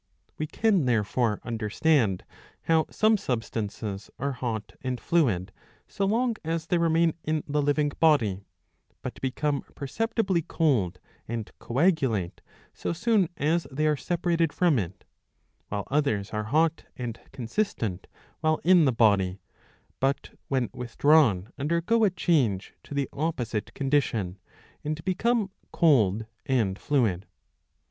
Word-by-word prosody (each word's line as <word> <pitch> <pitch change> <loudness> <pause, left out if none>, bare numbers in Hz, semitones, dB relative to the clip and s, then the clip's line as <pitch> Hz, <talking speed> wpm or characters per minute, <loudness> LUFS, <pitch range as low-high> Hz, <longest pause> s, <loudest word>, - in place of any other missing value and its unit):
We 155 - -1
can 200 -4 +2
therefore 115 -1 +1
understand 115 - +1 0.4
how 160 -1 +2
some 215 0 +3
substances 110 - -4
are 140 +1 -1
hot 120 -5 -4
and 130 -2 -3
fluid 115 - +1 0.4
so 195 - -1
long 230 +3 +1
as 165 0 -2
they 175 +1 +1
remain 165 0 +3
in 155 -1 -1
the 150 0 +1
living 145 +1 +1
body, 120 - +3 0.6
but - - -6
become 140 +2 -1
perceptibly 200 - 0
cold 130 - +1 0.3
and 115 -1 -4
coagulate 130 - +1 0.3
so - - -3
soon 200 -1 +2
as 165 +3 +1
they 150 +4 0
are 155 -1 +3
separated 170 0 0
from 165 -7 +3
it; 90 -1 -5 0.6
while 100 -1 -4
others 135 -9 +1
are 110 0 -2
hot 160 +7 +2
and 120 -3 -5
consistent 115 - -2 0.3
while 155 0 +1
in 175 -2 +6
the 135 - +4
body, 100 -5 +3 0.6
but 135 +1 0 0.2
when 130 -4 0
with 120 -2 -8
drawn 125 - +4
undergo 170 +10 +1
a 210 - +5
change 145 - +1
to 145 - -7
the 140 -2 0
opposite 130 -8 -2
condition, 120 -9 0 0.4
and 155 +1 -4
become 205 +2 +1 0.2
cold 115 - +3 0.2
and 110 -8 +1
fluid. 110 - +1
140 Hz, 130 wpm, -27 LUFS, 110-165 Hz, 0.6 s, in